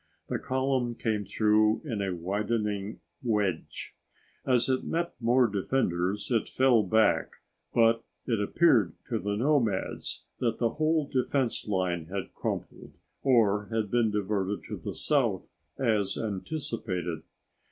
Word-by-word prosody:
The - - -1
column 130 -2 0
came 110 -3 -1
through 110 - +3
in 115 -8 -2
a 95 -2 -1
widening 105 +3 -2 0.2
wedge. 105 -8 -2 0.5
As 125 -2 +3
it 130 -1 +1
met 170 +1 -2
more 125 +2 +4
defenders 100 -2 -1
it 115 -3 +1
fell 130 -3 +4
back, 110 +3 +2 0.4
but 115 0 +4 0.2
it 115 -4 0
appeared 110 - +3 0.2
to - - 0
the 100 +2 -2
nomads 120 -6 0 0.2
that 115 -2 0
the 115 -2 +1
whole 155 -1 +1
defense 130 -3 0
line 90 -5 0
had 95 +1 -5
crumbled - - -5 0.3
or 105 -6 +3
had 110 -3 -2
been 120 -2 +3
diverted 105 -1 -1
to - - -4
the - - -6
south, - - 0 0.3
as 110 -6 +1
anticipated. 100 - -3
110 Hz, 130 wpm, -28 LUFS, 100-125 Hz, 0.5 s, more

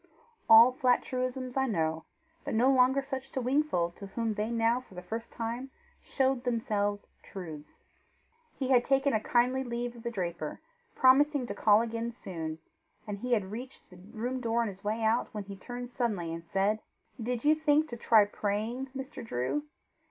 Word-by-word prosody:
All 225 +3 +9
flat 255 -2 +2
truisms 255 0 -3
I 265 0 +2
know, 160 -7 -1 0.4
but - - -3
no 250 +4 +4
longer 265 +1 +4
such 270 -1 -6
to - - -1
Wingfold 250 - +1
to 200 - -8
whom 225 +2 -2
they 210 +1 -2
now 230 +1 +2
for 195 - -18
the 180 - -7
first 225 +5 -5
time 235 +3 -4 0.3
showed 265 -2 0
themselves 210 -4 -1 0.2
truths. 160 -6 -10 0.7
He 265 -2 -3
had 250 -2 +5
taken 270 +1 +2
a 220 - +3
kindly 250 +4 +2
leave 240 -1 -4
of 235 - -11
the 235 - -3
draper, 170 -8 -4 0.4
promising 275 +1 +5
to - - -4
call 210 0 +4
again 230 0 -3
soon, 165 -9 -6 0.5
and 205 -2 -5
had 215 -5 0
reached 245 +1 -9
the 180 - -13
room 230 +7 -5
door 235 0 +1
on 225 - -2
his 195 0 -11
way 215 +2 -1
out, 220 +2 +2
when 210 - -3
he 200 0 -8
turned 245 +5 -7
suddenly 205 -10 -2
and 165 0 -6
said, 195 +5 0 0.4
"Did 240 +2 -3
you 300 - +7
think 310 0 +2
to 240 - -5
try 225 -2 +5
praying, 215 +6 -2
Mr. 265 -1 -7
Drew? 225 - -2
235 Hz, 180 wpm, -30 LUFS, 205-255 Hz, 0.7 s, All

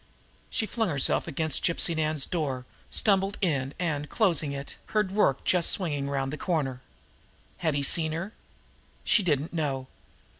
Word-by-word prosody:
She 225 - -1
flung 225 -1 -1
herself 140 +1 +1
against 160 -1 0
Gypsy 170 0 +2
Nan's 155 -3 +1
door, 135 -7 -2 0.2
stumbled 195 -1 +2
in, 140 -7 0
and, 150 -4 -1
closing 170 -9 +2
it, 140 0 -6
heard 210 -3 +1
Rorke 190 -10 +2
just 180 -2 +2
swinging 145 -7 0
around 135 -1 -1
the 150 - -4
corner. 135 -8 -1 0.8
Had 160 -4 0
he 140 - 0
seen 160 +2 +2
her? 180 +7 -4 0.7
She 210 - +4
didn't 155 -4 0
know. 140 -5 -1
155 Hz, 150 wpm, -28 LUFS, 140-180 Hz, 0.8 s, She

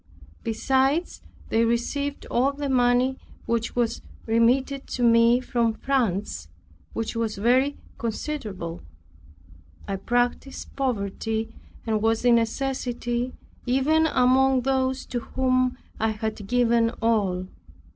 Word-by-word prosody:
Besides, 265 +8 0 0.3
they 225 - +3
received 275 +5 -1
all 265 +4 +2
the 285 0 -4
money 250 +1 +2 0.3
which 230 -1 -1
was 240 -2 0 0.2
remitted 255 +5 +2
to 245 - -3
me 230 +1 +5
from 235 -3 0
France, 200 - -1 0.5
which 225 0 -3
was 230 -2 -1
very 255 +7 +2 0.2
considerable. 215 - -4 1.1
I 195 - -2
practiced 245 +5 -2
poverty 225 -3 -2 0.3
and 220 -2 0
was 225 +2 +1
in 245 - +6
necessity 240 0 -1 0.3
even 300 +6 +3
among 260 -1 +3
those 265 0 0
to 245 - -3
whom 255 +1 0 0.2
I 220 - +2
had 215 -1 -4
given 235 -1 +3
all. 200 -6 +1
240 Hz, 110 wpm, -25 LUFS, 225-265 Hz, 1.1 s, in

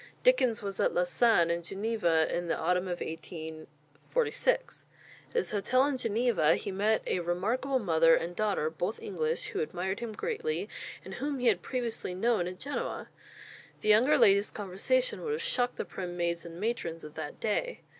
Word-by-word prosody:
Dickens 255 - +3
was 195 -1 -4
at - - +2
Lausanne 175 0 +3
and 170 0 -1
Geneva 190 -4 +1
in 175 0 -2
the 165 - 0
autumn 180 +2 +1
of 175 -1 -3
1846. 160 - -3 0.4
At - - -24
his 465 - +1
hotel 255 +6 +2
in 285 -2 0
Geneva 225 -8 +3
he - - -4
met 210 +3 +1
a - - 0
remarkable 215 +11 0
mother 165 -7 +5
and 175 +1 -3
daughter, 200 -7 0
both 180 +6 -3
English, 160 -4 -2
who - - -3
admired 180 +5 -2
him 230 -2 -5
greatly, 460 - -2 0.4
and - - -7
whom 280 +2 -2
he 250 - -3
had - - +1
previously 235 -7 -3
known 210 -2 +1
at 180 0 -6
Genoa. 285 +2 -4 0.7
The 215 - -1
younger 235 +8 +6
lady's 200 +1 +5
conversation 435 - -1
would 445 - -1
have 460 - -2
shocked 250 - 0
the - - -3
prim 175 -2 -6
maids 170 0 -1
and 170 +1 -9
matrons 190 -7 -2
of 150 - -9
that 160 -2 -6
day. 355 - -1
200 Hz, 175 wpm, -30 LUFS, 170-245 Hz, 0.7 s, younger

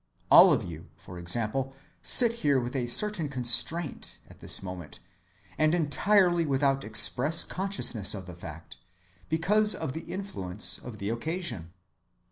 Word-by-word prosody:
All - - +8
of - - 0
you, 80 -2 -10
for 90 +1 -12
example, 115 +9 -2 0.3
sit 235 -2 +5
here 140 -3 +1
with 125 +2 -6
a 125 -2 -3
certain 170 - +1
constraint 135 +5 -2
at - - -18
this - - -2
moment, 90 -4 -9 0.6
and 155 +2 +2
entirely 175 +2 +1
without 135 -2 -1
express 125 +8 +3
consciousness 185 - -1
of 95 -2 -9
the 90 - -11
fact, 80 -6 -12 0.5
because 210 +7 +3
of 155 -5 -6
the 160 - -9
influence 110 - 0
of 120 -3 -11
the 100 0 -5
occasion. 120 - -5
135 Hz, 140 wpm, -26 LUFS, 105-170 Hz, 0.6 s, All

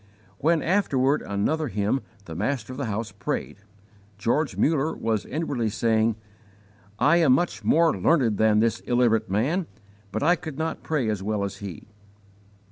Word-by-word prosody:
When, 160 +1 +2
after 185 -5 +1 0.2
another 150 +7 -1
hymn, 105 +4 0 0.2
the 80 - -8
master 110 - -2
of - - -9
the 140 - -2
house 110 +1 -3
prayed, - - -4 0.6
George 130 +9 0
Muller 155 0 +1
was 110 -2 -2
inwardly 135 -6 -2
saying: 110 0 +1 0.8
"I 170 - +4
am 160 -7 +5
much 175 +7 0
more 165 0 +4
learned 125 -11 +2
than 110 -1 +4
this 115 0 +1
illiterate 120 -4 +1
man, 145 - 0 0.4
but - - -2
I 175 +4 +5
could 155 -5 -8
not 160 0 -3
pray 150 -7 -1
as 105 -3 -1
well 105 0 -1
as 100 - -4
he." 100 -4 -8
120 Hz, 155 wpm, -25 LUFS, 110-155 Hz, 0.8 s, am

